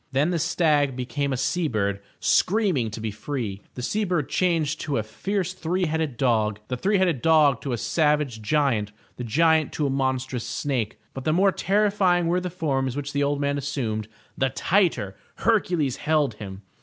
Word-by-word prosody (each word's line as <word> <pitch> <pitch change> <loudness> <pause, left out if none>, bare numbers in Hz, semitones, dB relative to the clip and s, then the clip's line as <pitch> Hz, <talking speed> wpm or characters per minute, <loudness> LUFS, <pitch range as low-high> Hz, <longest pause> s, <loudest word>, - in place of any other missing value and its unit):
Then 140 +6 +2
the 170 - 0
stag 145 -5 +2
be 125 -1 -3
came 140 +2 -2
a 130 - -1
sea 175 +5 0
bird 100 -5 -1 0.2
screaming 180 - +2
to 110 - -7
be 110 0 -3
free, 110 -3 -4
the 125 - -6
sea 215 - 0
bird 175 -7 -1
changed 165 -4 0
to 145 -2 -1
a 110 - 0
fierce 185 - -3
three 180 +1 -1
headed 155 -5 -2
dog, 110 -5 +1
the 125 - -1
three 195 +10 +1
headed 175 -9 +1
dog 155 -6 +4
to 135 - -4
a 120 - -1
savage 150 -4 +1
giant, 115 -5 +1 0.2
the 125 - -4
giant 160 +5 +3
to 150 - -1
a 140 - 0
monstrous 130 -2 -1
snake. 120 -2 -2
But 135 - -6
the 155 - +1
more 195 +3 +4
terrifying 195 -3 +2
were 175 +2 +1
the 180 - -3
forms 135 -7 -1
which 145 0 -4
the 140 - 0
old 145 0 +1
man 140 0 0
assumed, 120 -7 -3 0.3
the 135 - +1
tighter 165 - +1 0.2
Hercules 175 - +1
held 150 -4 +1
him. 100 -2 -9
145 Hz, 190 wpm, -25 LUFS, 125-170 Hz, 0.3 s, dog